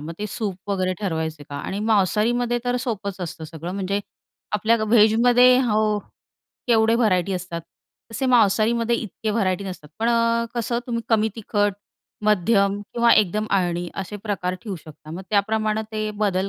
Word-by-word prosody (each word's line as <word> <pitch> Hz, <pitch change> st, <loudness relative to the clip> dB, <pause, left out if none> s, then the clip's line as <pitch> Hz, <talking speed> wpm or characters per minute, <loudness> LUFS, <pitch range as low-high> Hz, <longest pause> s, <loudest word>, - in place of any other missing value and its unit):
मग 155 Hz, +3 st, -6 dB
ते 210 Hz, -, -3 dB
सूप 200 Hz, -2 st, -5 dB
वगैरे 185 Hz, -1 st, 0 dB
ठरवायचं 160 Hz, -5 st, -3 dB
का 145 Hz, -, -5 dB
आणि 195 Hz, -, -4 dB
मांसाहारीमध्ये 225 Hz, +4 st, +2 dB
तर 245 Hz, 0 st, 0 dB
सोपंच 200 Hz, -6 st, -3 dB
असतं 170 Hz, -1 st, -6 dB
सगळं. 160 Hz, +2 st, -7 dB
म्हणजे 195 Hz, +1 st, -1 dB, 0.5 s
आपल्या 220 Hz, +3 st, +3 dB
व्हेजमध्ये 240 Hz, +3 st, +5 dB
हो 215 Hz, -3 st, +1 dB, 0.7 s
केवढे 225 Hz, -1 st, +4 dB
व्हरायटी 195 Hz, -5 st, +2 dB
असतात. 180 Hz, -2 st, -4 dB, 0.5 s
तसे 265 Hz, +4 st, -1 dB
मांसाहारीमध्ये 230 Hz, 0 st, +3 dB
इतके 220 Hz, 0 st, -4 dB
व्हरायटी 200 Hz, -3 st, 0 dB
नसतात. 180 Hz, -6 st, -8 dB
पण 230 Hz, -, +2 dB
अ, 230 Hz, 0 st, +2 dB
कसं 235 Hz, 0 st, -1 dB
तुम्ही 235 Hz, -2 st, -2 dB
कमी 220 Hz, -1 st, +3 dB
तिखट, 205 Hz, -2 st, 0 dB, 0.5 s
मध्यम 200 Hz, 0 st, +2 dB
किंवा 235 Hz, 0 st, +5 dB
एकदम 210 Hz, +2 st, +2 dB
आळणी 175 Hz, -2 st, 0 dB
असे 195 Hz, +1 st, -5 dB
प्रकार 185 Hz, -4 st, -2 dB
ठेऊ 200 Hz, -5 st, -5 dB
शकता. 155 Hz, 0 st, -13 dB
मग 175 Hz, +4 st, -6 dB
त्याप्रमाणे 215 Hz, +1 st, +1 dB
ते 215 Hz, 0 st, -2 dB
बदल 195 Hz, -1 st, +1 dB
210 Hz, 155 wpm, -23 LUFS, 185-230 Hz, 0.7 s, व्हेजमध्ये